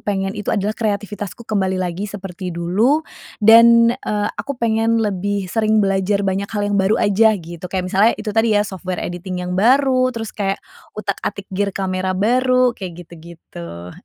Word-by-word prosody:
pengen 195 -1 -2
itu 205 - -6
adalah 205 0 0
kreativitasku 205 -1 -4
kembali 190 -3 -1
lagi 185 +2 -3
seperti 190 -2 -7
dulu, 220 - +1 0.3
dan, 230 +2 +7
eee, 205 -1 -1
aku 280 -1 -5
pengen 230 -1 +1
lebih 205 -2 -1
sering 220 -1 +2
belajar 195 +1 0
banyak 195 +1 -1
hal 205 -2 -3
yang - - +2
baru 190 +3 +2
aja 215 +1 +3
gitu, 170 0 -9
kayak 185 0 -2
misalnya 200 +5 +3
itu 210 -2 -5
tadi 225 -1 +2
ya, 205 - +2
software 185 -2 -5
editing 180 +1 -5
yang 180 - -4
baru, 255 +5 +3
terus 225 -3 -5
kayak 195 -1 -1 0.4
utak-atik 200 -1 -4
gear 200 +2 0
camera 185 -1 -2
baru, 255 +4 +3
kayak 175 -5 -8
gitu-gitu. 125 - -11
200 Hz, 160 wpm, -19 LUFS, 185-225 Hz, 0.4 s, dan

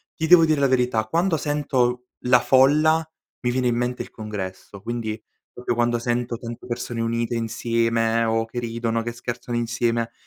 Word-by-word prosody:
ti 160 - -2
devo 165 -1 +8
dire 155 -2 +2
la 140 - +4
verità, 125 -4 +1
quando 170 +8 +1
sento 130 -5 0 0.2
la 125 0 +6
folla, 150 +6 +4 0.4
mi 125 - 0
viene 125 0 0
in 120 - +1
mente 120 +1 -2
il - - -15
congresso. 100 -2 -7
Quindi, 115 -2 -3 0.3
proprio 125 -1 -3
quando 120 0 +1
sento 120 0 -2
tante 115 0 -8
persone 120 -1 -4
unite 115 +1 -1
insieme, 115 0 0
o 115 0 +1
che 120 +2 -5
ridono, 115 -1 -2
che 120 +1 -4
scherzano 120 0 -5
insieme, 115 0 -1
120 Hz, 170 wpm, -23 LUFS, 115-125 Hz, 0.4 s, devo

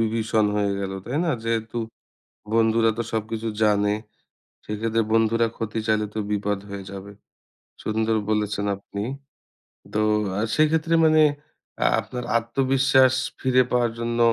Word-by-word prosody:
বিভীষণ 110 -1 +1
হয়ে 100 -1 +1
গেল। 95 -1 -3
তাই 135 +5 -2
না? 165 - +1
যেহেতু 115 0 -2 0.8
বন্ধুরা 115 0 +3
তো 115 - -1
সবকিছু 110 +1 -2 0.2
জানে। 105 -1 +3 0.7
সেক্ষেত্রে 115 +2 -1
বন্ধুরা 115 +1 +3
ক্ষতি 110 -1 -3
চাইলে 110 -1 +2
তো 110 - -3
বিপদ 105 -1 -1
হয়ে 100 -1 -6
যাবে। 100 +1 -8 0.7
সুন্দর 110 +1 0
বলেছেন 105 -1 0
আপনি। 100 +1 -6 0.9
তো 105 - 0 0.4
আ - - 0 0.2
সেক্ষেত্রে 160 +2 +2
মানে 155 0 +5 0.6
আ - - +6
আপনার 125 -1 -6
আত্মবিশ্বাস 130 +2 +3 0.3
ফিরে 130 -1 +4
পাওয়ার 120 -2 +2
জন্য 120 0 -2
115 Hz, 130 wpm, -24 LUFS, 105-120 Hz, 0.9 s, আ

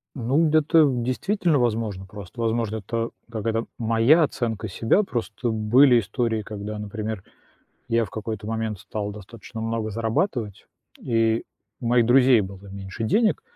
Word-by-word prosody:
Ну 135 +5 +2
ведь 155 - 0
это, 155 +1 +5
действительно, 140 - 0
возможно. 110 -5 -1
Просто, 100 +4 -10
возможно, 115 -1 0
это 115 +2 -3 0.2
какая-то 115 +1 -2
моя 115 +8 +4
оценка 115 -6 -2
себя. 115 - +2
Просто 120 - -3
были 120 +4 +5
истории, 115 0 -1
когда, 105 +1 -6
например, 105 -1 -5 0.7
я 115 0 +2
в - - -10
какой-то 110 -1 -5
момент 110 -2 -2
стал 105 -1 -4
достаточно 110 +2 -10
много 115 -1 -2
зарабатывать, 115 - -2 0.3
и 115 -1 +1 0.4
у 120 - -4
моих 120 -1 +4
друзей 125 -1 +6
было 95 0 -7
меньше 100 +3 -6
денег. 215 - +2
115 Hz, 140 wpm, -24 LUFS, 105-120 Hz, 0.7 s, друзей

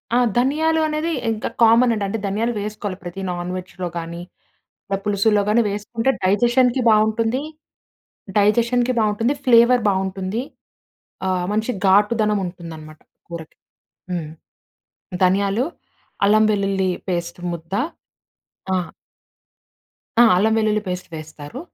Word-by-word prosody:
ఆ! - - +5 0.2
ధనియాలు 315 +5 +2
అనేది 310 +2 -2 0.2
ఇంక 220 -1 -2 0.2
కామన్ 230 +2 +6
అండి. 210 -2 -2
అంటే 200 - -2
ధనియాలు 215 +4 0
వేసుకోవాలి. 210 -2 -5
ప్రతి 175 +2 -6
నాన్‌వెజ్‌లో 180 +1 -5
గానీ, 170 +1 -6 0.7
ఇలా 195 - -1
పులుసులో 205 +1 +2
గాని 230 +3 +4
వేసుకుంటే 225 +5 -1
డైజెషన్‌కి 240 +6 +3
బావుంటుంది 220 +3 +2 1.0
డైజెషన్‌కి 235 +4 +2
బాగుంటుంది. 220 +5 +1
ఫ్లేవర్ 240 0 +6
బావుంటుంది. 190 +2 -2 0.9
ఆహ్, 185 -1 0
మంచి 220 +3 0 0.2
ఘాటుదనం 210 +1 +3
ఉంటుందన్నమాట, 160 -3 -9 0.3
కూరకి. 165 -2 -9 0.5
హ్మ్. 170 -4 -3 0.9
ధనియాలు, 200 +6 +2 0.6
అల్లం 215 +2 +5
వెల్లుల్లి 195 -2 0 0.2
పేస్ట్ 170 0 -3
ముద్ద. 165 +2 -9 1.0
ఆ! 185 - +2 1.4
ఆ! - - +9
అల్లం 215 +5 +3
వెల్లుల్లి 215 -1 +1
పేస్ట్ 180 -1 -5
వేస్తారు. 155 - -9
205 Hz, 110 wpm, -21 LUFS, 185-230 Hz, 1.4 s, ఆ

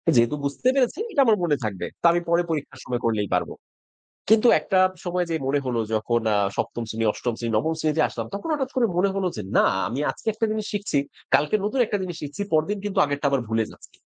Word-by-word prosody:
যেহেতু 120 +4 +4
বুঝতে 140 - -2
পেরেছি 270 +4 +1
এটা 285 -8 +3
আমার 220 -3 +4
মনে 155 -4 +2
থাকবে। 105 -4 -3 0.2
তা - - -3
আমি 175 +1 +1
পরে 170 +1 +4
পরীক্ষার 150 -3 -4
সময় 125 -1 -2
করলেই 105 -4 0
পারব।" - - -1 0.8
কিন্তু 220 +2 +6
একটা 190 - +1 0.3
সময় 180 0 0
যেয়ে 160 -4 -2
মনে 140 +1 +1
হলো 120 -2 0
যখন 115 +2 +1
আ - - +3 0.2
৭ম 120 - -2
শ্রেণী, 115 +1 -2
৮ম 120 +1 -3
শ্রেণী, 115 -1 -3
৯ম 160 +9 +1
শ্রেণীতে 155 0 +1
আসলাম - - -5
তখন 200 +11 -5
হঠাৎ 265 -3 -1
করে 245 -2 +4
মনে 190 +3 +3
হলো 195 -1 -1
যে, 105 - -4
"না - - +6 0.2
আমি 130 +5 -3
আজকে - - -12
একটা 220 +2 -2
জিনিস 215 -1 -2
শিখছি, 205 -8 -1 0.4
কালকে 150 +7 +3
নতুন 235 +6 -1
একটা 210 - -1
জিনিস 175 -3 -5
শিখছি। 150 +7 -5
পরদিন 160 +7 +1
কিন্তু 205 -2 -2
আগেরটা 145 0 -1
আবার 135 -3 +1
ভুলে 110 0 +1
যাচ্ছি। - - -18
160 Hz, 220 wpm, -24 LUFS, 120-205 Hz, 0.8 s, কিন্তু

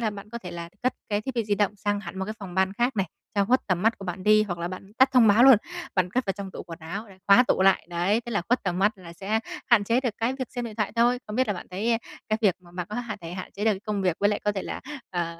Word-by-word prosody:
là 220 -2 0
bạn 205 +1 -10
có 235 - -5
thể 180 -6 -8
là 170 -1 -6
cất 255 - +2 0.2
cái 205 -1 0
thiết 260 +4 -5
bị 230 -2 0
di 205 -1 +1
động 205 0 0
sang 205 0 -1
hẳn 190 -1 -8
một 190 - -1
cái 215 - -5
phòng 190 -4 -8
ban 190 0 +2
khác 240 +4 0
này, 195 -2 +1 0.3
cho 200 -1 +3
khuất 250 +5 +3
tầm 185 -2 0
mắt 225 +1 +2
của 195 - -8
bạn 180 0 -5
đi. 215 +1 +5
Hoặc 175 -5 -4
là 170 +1 -2
bạn 190 +2 -9
tắt 260 - +7
thông 245 -4 +6
báo 215 +4 +6
luôn, 265 -4 +9 0.4
bạn 180 -1 +1
cất 255 +4 0
vào 195 - +1
trong 195 -1 -7
tủ - - -7
quần 165 -2 -9
áo 185 +7 -6
rồi 190 -1 -16
khóa 200 +5 +7
tủ 185 - +3
lại, 195 -3 +4
đấy, 180 +6 +1
thế 240 - -4
là 205 -5 0
khuất 245 +1 +2
tầm 180 -2 -1
mắt 205 +3 +3
là 170 -2 -11
sẽ 205 +5 -1 0.3
hạn 235 -5 +5
chế 235 +4 +2
được 250 -3 0
cái 230 +3 +1
việc 260 - -3
xem 245 - -2
điện 225 -2 -6
thoại 210 -2 -1
thôi. 240 +2 +4
Không 210 +1 -5
biết 260 - +3
là - - +2
bạn 175 - -8
thấy 225 +5 0 0.3
cái 215 0 +1
việc 190 -4 +4
mà 175 - -18
bạn 180 -1 -4
có - - -4
hạn 235 -3 -4
thể 165 0 -7
hạn 185 0 -7
chế 205 - -4
được 220 - +4
cái 190 - -5
công 210 -2 -2
việc 180 -3 +1
với 205 - +4
lại 210 - -1
có 210 - +2
thể 195 -2 -3
là, - - -5 0.3
ờ, 170 -2 -3
205 Hz, 330 wpm, -26 LUFS, 185-225 Hz, 0.4 s, luôn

